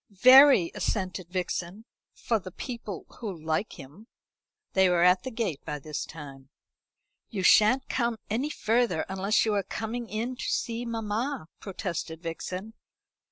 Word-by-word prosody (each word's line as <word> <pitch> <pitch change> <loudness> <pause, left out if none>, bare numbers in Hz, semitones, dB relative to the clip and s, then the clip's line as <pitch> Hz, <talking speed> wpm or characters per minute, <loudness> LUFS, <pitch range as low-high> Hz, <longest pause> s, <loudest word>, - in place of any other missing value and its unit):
"Very," 255 -1 +7
assented 185 -3 -2
Vixen, 185 +2 -4 0.3
"for 225 -2 -1
the 185 - -9
people 210 -1 -7
who 220 -4 -4
like 160 +6 -2
him." 150 - -13 0.7
They 190 -1 +4
were 175 -1 +3
at 180 +1 +5
the 260 - -5
gate 220 - -3
by 150 - -4
this 150 +1 -5
time. 140 -4 -11 0.8
"You 195 -5 -4
shan't 220 +7 +5
come 235 -2 -1
any 245 +8 -1
further 225 - +1
unless 195 +4 +1
you 215 - +1
are 200 - +2
coming 225 +4 -5
in 230 +5 -3
to - - -5
see 235 +1 -2
mamma," 225 - -3
protested 175 -4 -5
Vixen. 180 +5 -5
200 Hz, 145 wpm, -28 LUFS, 175-230 Hz, 0.8 s, Very